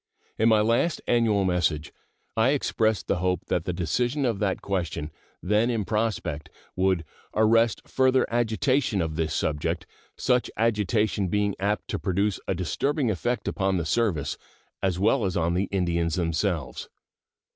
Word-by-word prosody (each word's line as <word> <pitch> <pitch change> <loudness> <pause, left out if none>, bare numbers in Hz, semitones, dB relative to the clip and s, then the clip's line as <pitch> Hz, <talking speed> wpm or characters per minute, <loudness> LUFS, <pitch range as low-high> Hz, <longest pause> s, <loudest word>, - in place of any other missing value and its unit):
In 110 +1 +5
my 110 -1 +5
last 115 +9 +1
annual 110 -5 +3
message 85 -4 0 0.4
I 115 +3 +3
expressed 110 -6 0
the - - 0
hope 90 +1 -1
that 85 - 0
the - - -1
decision 120 - 0
of 115 -5 0
that 100 -3 -1
question, 85 -6 -2 0.3
then 105 +5 +2
in 115 -4 -1
prospect, 105 -9 -2 0.3
would 95 -3 +1 0.3
"arrest 115 +1 +3
further 130 -1 +3
agitation 120 0 +1
of 80 -3 -1
this 80 -1 -1
subject, 75 -1 -1 0.3
such 125 -1 +1
agitation 105 -2 +1
being 100 +2 +1
apt 100 +2 -1
to - - -2
produce 100 +1 0
a 95 - 0
disturbing 125 - 0
effect 115 +4 -2
upon 95 -2 0
the 85 - -2
service 90 -4 0 0.4
as 95 -2 0
well 110 +6 +2
as 95 -2 -1
on 85 0 +1
the 95 +3 +1
Indians 85 -4 0
themselves." 85 -2 -2
100 Hz, 150 wpm, -26 LUFS, 90-115 Hz, 0.4 s, In